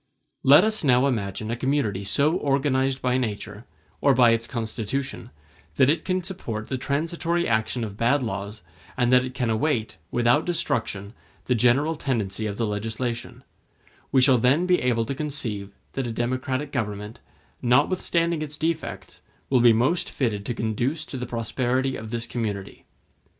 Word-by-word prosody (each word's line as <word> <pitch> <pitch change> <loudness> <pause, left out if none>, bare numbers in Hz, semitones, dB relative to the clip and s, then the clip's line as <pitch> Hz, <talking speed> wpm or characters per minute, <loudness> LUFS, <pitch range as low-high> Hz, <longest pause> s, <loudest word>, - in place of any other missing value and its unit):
Let 145 +6 +7
us 215 -2 0
now 130 -2 +4
imagine 110 -4 -2
a - - 0
community 120 -6 0
so 140 +10 +2
organized 135 -2 +1
by 125 0 +2
nature, 105 -2 -4 0.4
or 140 -2 +4
by 120 -2 +6
its 115 0 0
constitution, 120 +3 -4 0.5
that 130 - +5
it 160 0 -1
can 185 -1 -1
support 115 - -5
the 130 - -1
transitory 165 +5 -1
action 110 +1 0
of 105 -2 -6
bad 125 +5 +2
laws, 100 -2 -5 0.3
and 125 -1 +2
that 125 0 +6
it 130 0 -6
can 125 -4 0
await, 110 -3 0
without 120 +5 +3
destruction, 115 - -2 0.3
the 125 - +2
general 125 +7 +3
tendency 110 -7 -2
of 100 -1 -5
the 115 - 0
legislation: 115 +3 -4 0.7
we 130 - +5
shall 130 -2 +5
then 135 +9 +3
be 180 -1 +3
able 115 -2 +1
to 140 - -3
conceive 125 -9 -4 0.2
that 135 -2 -2
a - - -3
democratic 130 +4 -2
government, 105 -4 -4 0.4
notwithstanding 165 +5 +2
its 150 -1 -5
defects, 160 0 -3 0.3
will 130 -3 +5
be 120 -1 +7
most 130 +10 +1
fitted 105 -6 -2
to 120 - -2
conduce 120 +9 -1
to - - -8
the 125 -2 -4
prosperity 125 +3 -1
of 110 0 -7
this 115 0 -2
community. 105 -5 -4
125 Hz, 160 wpm, -25 LUFS, 110-140 Hz, 0.7 s, Let